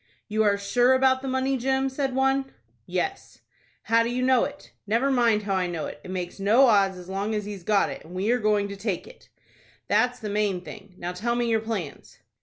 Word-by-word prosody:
"You 215 0 0
are 205 -1 +3
sure 245 +6 +3
about 260 0 +3
the 270 - -5
money, 260 +1 0
Jim," 265 +2 0
said 265 -1 -2
one. 270 0 +1 0.4
"Yes." 390 0 -4 0.4
"How 230 +1 +3
do 230 - 0
you 250 +1 -1
know 255 -1 +4
it?" 285 0 -10 0.2
"Never 235 +6 +2
mind 230 -5 +3
how 200 -1 -2
I 185 -1 +1
know 170 -3 -4
it. 150 - -8
It - - -10
makes 180 0 -5
no 220 +7 +5
odds 200 -5 +3
as 180 -1 -11
long 200 +3 -2
as 210 -1 -2
he's 205 -2 -7
got 200 +2 +2
it, - - -8
and 175 +3 -11
we 195 +5 0
are 250 - +2
going 210 -2 +1
to 200 - -6
take 195 -2 -3
it." - - -16 0.6
"That's 245 0 +2
the 215 - -6
main 205 -3 0
thing. 190 +3 -12
Now 175 0 -4
tell 230 +7 -2
me 240 0 0
your 225 - +3
plans." 210 -10 -6
220 Hz, 225 wpm, -25 LUFS, 195-260 Hz, 0.6 s, no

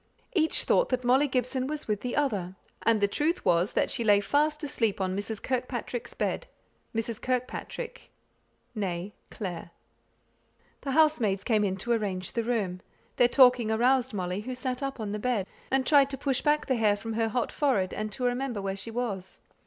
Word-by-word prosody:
Each 320 -5 +2
thought - - +3
that 255 -1 0
Molly 260 +4 +4
Gibson 255 0 -1
was 300 +1 -4
with 210 -2 -1
the 250 - -3
other, 200 -11 0 0.3
and 225 -2 +3
the 200 - +4
truth 305 - 0
was, 175 +3 +3
that - - +1
she 240 - -1
lay 205 -2 +5
fast 300 +9 +1
asleep 225 -8 0
on 185 -1 -1
Mrs. 205 +1 -4
Kirkpatrick's 250 -1 -3
bed - - -2 0.5
Mrs. 225 0 -2
Kirkpatrick 255 - -4 0.7
nÄe 190 -2 -3 0.2
Clare. 175 -5 -6 1.1
The 275 - -3
housemaids 250 -11 +3
came 215 -2 +2
in 190 -2 0
to 240 +6 -3
arrange 195 -5 -1
the 230 - 0
room. 205 -6 -1 0.4
Their 245 - +6
talking 250 -3 +5
aroused 250 +3 +3
Molly, 185 -1 -2
who 255 +3 -5
sat 255 0 -3
up 275 -2 -3
on 210 -2 -3
the 210 - -3
bed, 230 -4 0 0.2
and 265 0 +1
tried 280 0 +5
to 270 - -4
push 270 -1 0
back 300 0 +2
the 260 -3 +1
hair 215 -2 +3
from 225 +2 -5
her 225 0 +1
hot 240 +2 -1
forehead, 230 -11 +1
and 215 0 -3
to 255 - -4
remember 245 -2 -1
where 195 -1 -2
she 195 +4 -6
was. 215 -6 -4
235 Hz, 185 wpm, -28 LUFS, 205-265 Hz, 1.1 s, Their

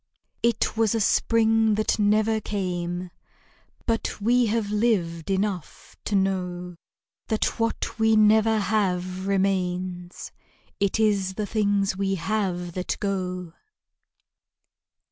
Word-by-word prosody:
It 235 -1 +1
was 225 -1 +2
a - - +1
spring 225 +1 +3
that 215 +1 0
never 215 +1 +2
came; 180 -3 -3 0.7
But 225 -2 -1
we 240 +3 +3
have 215 -1 -1
lived 195 -7 0
enough 195 -3 -3
to 205 - -1
know 180 -2 -1 0.5
That 220 +2 -1
what 230 0 -2
we 220 0 +4
never 220 +1 +4
have, 190 -3 -1
remains; 185 -2 -1 0.5
It 200 +2 +1
is 200 -3 +1
the 210 - -2
things 200 -2 +1
we 195 0 0
have 180 -1 -2
that 185 0 -3
go. 185 -4 -3
200 Hz, 110 wpm, -25 LUFS, 180-220 Hz, 0.7 s, we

